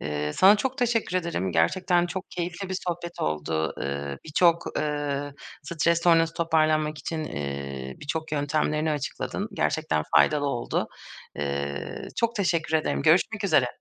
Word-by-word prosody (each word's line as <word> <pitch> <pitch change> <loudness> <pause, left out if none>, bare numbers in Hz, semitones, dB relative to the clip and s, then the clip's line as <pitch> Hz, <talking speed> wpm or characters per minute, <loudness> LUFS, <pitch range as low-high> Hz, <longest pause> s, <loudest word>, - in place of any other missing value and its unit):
Eee, 75 0 -2
sana 200 +3 +7
çok 260 +4 -2
teşekkür 230 -6 +1
ederim. 170 - -1
Gerçekten 175 - +2
çok 190 +2 -6
keyifli 180 +2 -4
bir 190 - -2
sohbet 175 0 -4
oldu. 80 +1 -1
Iıı, 70 0 -3
birçok, 170 +2 +3
ııı, 145 -1 -2 0.3
stres 170 +3 +1
sonrası 165 -1 +4
toparlanmak 155 -2 +2
için, 160 -2 -3
iii, 70 - -5
birçok 155 +1 -4
yöntemlerini 150 +1 0
açıkladın. 145 -3 -3
Gerçekten 80 -1 0
faydalı 145 -2 +4
oldu. 120 -4 -1 0.5
Eee, 70 0 -3
çok 230 0 +1
teşekkür 170 -5 0
ederim. 70 - -1
Görüşmek - - +3
üzere. - - +4
155 Hz, 135 wpm, -26 LUFS, -, 0.5 s, sana